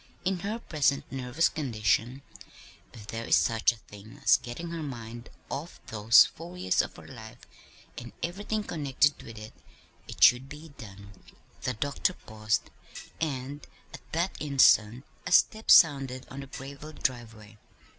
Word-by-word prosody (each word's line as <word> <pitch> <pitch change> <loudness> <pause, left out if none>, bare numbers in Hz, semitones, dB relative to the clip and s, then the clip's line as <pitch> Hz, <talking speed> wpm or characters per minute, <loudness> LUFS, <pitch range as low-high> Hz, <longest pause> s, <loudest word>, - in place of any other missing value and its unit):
In 185 -1 0
her 205 +5 -3
present 145 -10 0
nervous 135 +5 0
condition, 120 - -1 0.7
if 110 -3 -12
there 115 +1 -6
is - - +5
such 110 +8 +3
a - - -11
thing 105 -1 -14
as - - +6
getting 165 +8 -7
her 165 -1 -4
mind 120 -4 -8 0.2
off 155 +5 -6
those 110 +1 +6
four 175 +3 -10
years 95 - +2
of - - -7
her - - -13
life 110 -4 -11 0.6
and - - -10
everything 205 +5 -3
connected 145 -4 0
with 115 -1 -11
it, 110 +1 -10 0.5
it - - -2
should 125 +2 +6
be 150 +3 -10
done." 100 -3 -11 0.5
The 125 - -2
doctor 145 +9 -1
paused, 110 -7 -3 0.5
and 140 -2 -4 0.3
at - - -9
that 170 +4 -1
instant 130 -4 +4 0.2
a - - -4
step 220 +4 +3
sounded 135 -5 +5
on 135 - -7
the 135 - -8
graveled 140 +3 -10
driveway. 115 -5 -4
130 Hz, 150 wpm, -28 LUFS, 115-155 Hz, 0.7 s, as